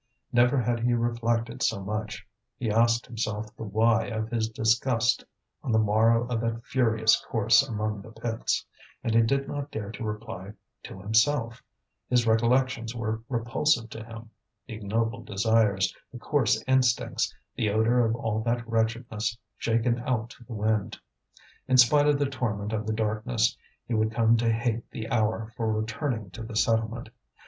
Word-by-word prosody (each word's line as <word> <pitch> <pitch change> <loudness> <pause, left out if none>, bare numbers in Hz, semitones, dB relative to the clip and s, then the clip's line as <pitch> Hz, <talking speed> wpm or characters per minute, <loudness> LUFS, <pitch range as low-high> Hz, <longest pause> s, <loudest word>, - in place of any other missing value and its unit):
Never 120 +3 +4
had 120 0 0
he 120 +1 +2
reflected 115 +1 -1
so - - +1
much; 110 +1 -4 0.3
he 115 -4 -1
asked 115 +2 +3
himself 110 -2 -4
the - - -13
why 110 +2 +2
of 110 -1 -3
his 110 -2 -1
disgust 115 +2 +1 0.4
on 125 - -3
the 110 - +3
morrow 110 +2 +3
of 120 -2 -2
that 115 +1 -3
furious 110 -4 +2
course 115 +2 +4
among 110 -5 -3
the 105 - -12
pits; 115 0 -2 0.4
and 115 - 0
he 115 - +6
did 135 +4 +1
not 145 0 -4
dare 105 -6 -5
to 115 - -7
reply 105 -2 -6 0.3
to 95 - -9
himself, 115 +4 +1 0.5
his 125 -1 +3
recollections 115 +1 +2
were 110 -1 -2
repulsive 120 0 0
to 110 - -7
him, 115 0 -11 0.3
the - - -8
ignoble 110 +2 -2
desires, 105 -2 +2 0.2
the 125 - -8
coarse 115 -4 +1
instincts, 130 -3 +2 0.2
the 110 - 0
odour 110 +4 +2
of 115 0 +1
all 110 -2 -2
that 115 0 -1
wretchedness 115 -1 -1 0.2
shaken 115 +1 +1
out 120 -3 -1
to - - -14
the 120 - -8
wind. 110 -1 -1 0.7
In 130 -1 +4
spite 145 +4 +6
of 145 -1 +4
the 145 - +1
torment 110 -6 -3
of 110 0 -2
the 110 - 0
darkness, 110 +1 0 0.3
he 120 - -3
would 110 0 +1
come 115 0 +3
to 115 0 +2
hate 115 0 -1
the 110 - -6
hour 110 0 0
for 110 -2 -1
returning 110 - -2
to 115 - -9
the 110 0 -7
settlement. 115 +1 0
115 Hz, 165 wpm, -27 LUFS, 110-120 Hz, 0.7 s, he